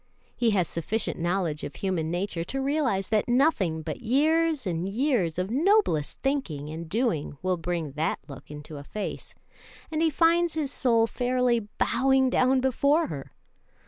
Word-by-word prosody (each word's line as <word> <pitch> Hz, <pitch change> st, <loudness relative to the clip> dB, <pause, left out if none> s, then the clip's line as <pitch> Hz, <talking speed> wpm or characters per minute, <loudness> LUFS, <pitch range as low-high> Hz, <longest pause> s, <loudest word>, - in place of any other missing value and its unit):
He 235 Hz, -, +2 dB
has 190 Hz, -6 st, +2 dB
sufficient 200 Hz, +7 st, -2 dB
knowledge 170 Hz, -3 st, -1 dB
of 140 Hz, -, -6 dB
human 180 Hz, -5 st, -1 dB
nature 175 Hz, 0 st, -2 dB
to 270 Hz, -, -3 dB
realize 265 Hz, -9 st, 0 dB
that 215 Hz, -2 st, +1 dB
nothing 230 Hz, -, +2 dB
but -, -, -5 dB
years 305 Hz, +4 st, +2 dB
and 175 Hz, 0 st, -2 dB
years 220 Hz, -, 0 dB
of 185 Hz, +3 st, -2 dB
noblest 310 Hz, -, +2 dB
thinking 175 Hz, -, -2 dB
and 160 Hz, +1 st, -7 dB
doing 210 Hz, -, -1 dB
will 185 Hz, 0 st, +1 dB
bring 165 Hz, -3 st, -3 dB
that 155 Hz, +4 st, -1 dB
look 140 Hz, -3 st, -11 dB
into 150 Hz, +1 st, -9 dB
a 140 Hz, -, -8 dB
face, 210 Hz, +8 st, -6 dB, 0.6 s
and 315 Hz, 0 st, -1 dB
he 330 Hz, -, +4 dB
finds 335 Hz, +2 st, +3 dB
his 295 Hz, -4 st, -1 dB
soul 230 Hz, -3 st, +3 dB
fairly 245 Hz, -2 st, 0 dB
bowing 265 Hz, 0 st, +3 dB
down 255 Hz, +1 st, +3 dB
before 280 Hz, +5 st, +2 dB
her. 140 Hz, -4 st, -7 dB
225 Hz, 160 wpm, -27 LUFS, 165-270 Hz, 0.6 s, he